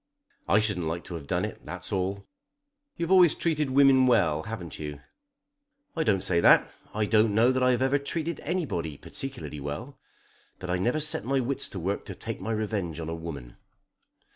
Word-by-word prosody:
"I 100 - +4
shouldn't 105 -6 0
like 85 +2 -3
to - - -9
have 80 -4 -7
done - - 0
it; - - -8
that's - - -7
all." 95 +1 -2 0.7
"You've 170 +1 -2
always 180 -4 +6
treated 155 -4 0
women 135 -1 +5
well; 80 -11 +3
haven't 90 -6 -7
you?" 75 -2 -6 1.0
"I 165 - +1
don't 100 -7 +1
say 85 -2 +1
that. - - +5 0.2
I 110 0 0
don't 110 -1 +3
know 115 +3 +5
that 130 0 0
I've 125 0 +3
ever 135 +2 +2
treated 160 +3 -2
anybody 130 - -3
particularly 130 - -6
well. 75 - -6 0.6
But 90 -1 -5
I 90 - +1
never 120 +10 +1
set 155 -8 +1
my 135 +4 +1
wits 130 +2 -1
to 95 - -6
work 95 +4 -2
to - - -7
take - - -5
my 110 +4 -3
revenge 105 -7 -2
on 80 -1 -4
a - - -3
woman." 75 -8 -8
110 Hz, 190 wpm, -27 LUFS, 85-135 Hz, 1.0 s, always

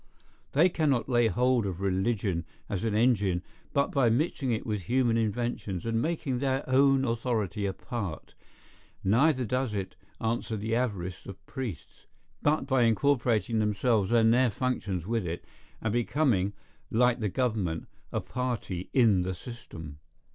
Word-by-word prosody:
They 160 +6 +6
cannot 150 -8 +1
lay 120 -2 +4
hold 125 -2 +2
of 90 -2 -4
religion 95 -2 0 0.2
as 100 0 -3
an 110 -2 0
engine 105 -6 +2 0.3
but 140 0 +1
by 135 -4 +3
mixing 135 +2 0
it 110 - -1
with 105 -3 -2
human 125 -2 +3
inventions, 110 -4 -2
and 115 0 0
making 150 -5 -1
their 135 0 0
own 135 +1 +4
authority 110 -4 -1
a 95 - -2
part; 100 -7 -5 0.7
neither 125 +6 +3
does 125 -1 -1
it 95 -2 -4 0.2
answer 115 0 -1
the 110 +2 -2
avarice 95 -8 -2
of 100 - -10
priests, 120 - -7 0.3
but 150 +1 +2
by 130 -3 +2
incorporating 115 -1 +2
themselves 105 0 +1
and 115 -1 +5
their 125 0 +4
functions 105 -6 -2
with 115 +1 0
it, 85 +1 -5 0.4
and 110 -2 0
becoming, 120 -5 +1 0.4
like 125 +2 +3
the 105 -2 0
government, 105 -8 -1 0.2
a - - -1
party 120 -8 -3
in 110 -8 +5
the 95 +1 -2
system. 80 - -9
115 Hz, 145 wpm, -29 LUFS, 100-125 Hz, 0.7 s, They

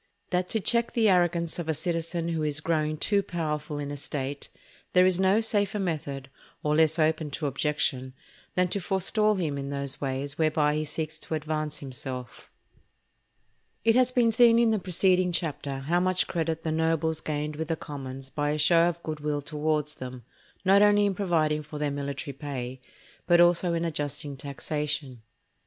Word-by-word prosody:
—_That 180 0 +1
to 220 - 0
check 235 +3 +1
the 225 -3 +3
arrogance 175 -2 +2
of 165 -2 -4
a 160 - +1
Citizen 165 +1 -2
who 165 -2 -1
is 150 -1 0
growing 155 -1 0
too 200 +6 +2
powerful 155 -5 -3
in 145 -1 -4
a - - -4
State, 140 0 -4 0.4
there 180 0 +6
is 185 -1 +3
no 190 +3 +4
safer 210 -2 +1
Method, 145 -8 -3 0.4
or 150 0 +1
less 160 0 +4
open 155 -1 +1
to 145 +2 -4
objection, 135 -2 -1 0.4
than 180 0 +3
to 200 - 0
forestall 205 +3 +2
him 155 -7 -2
in 140 0 -5
those 140 -1 -3
Ways 140 +2 -3
whereby 155 -1 +2
he 155 +1 -1
seeks 155 +1 -4
to 160 - -3
advance 155 0 -3
himself_. 130 -3 -7 1.4
It 225 0 +5
has 255 0 +5
been 245 -2 +3
seen 230 0 +6
in 235 -1 +4
the 215 - +1
preceding 185 0 +2
chapter 145 -5 -2
how 165 +6 +1
much 185 0 +2
credit 165 -1 -2
the 160 - -1
nobles 160 0 +1
gained 150 0 -3
with 160 +1 -4
the 165 - 0
commons 135 -3 -8
by 145 +1 -1
a 150 - 0
show 165 +3 +4
of 170 0 -7
good 155 -1 -4
will 145 -1 -2
towards 150 0 -1
them, 125 -1 -8 0.4
not 195 +2 +6
only 205 0 +5
in 200 - +1
providing 160 -6 +1
for 150 0 -9
their 150 -1 -1
military 140 0 -4
pay, 130 -2 -6 0.5
but 175 -1 +5
also 175 0 +4
in 165 0 -1
adjusting 145 -2 -3
taxation. 140 -2 -4
155 Hz, 180 wpm, -27 LUFS, 145-180 Hz, 1.4 s, there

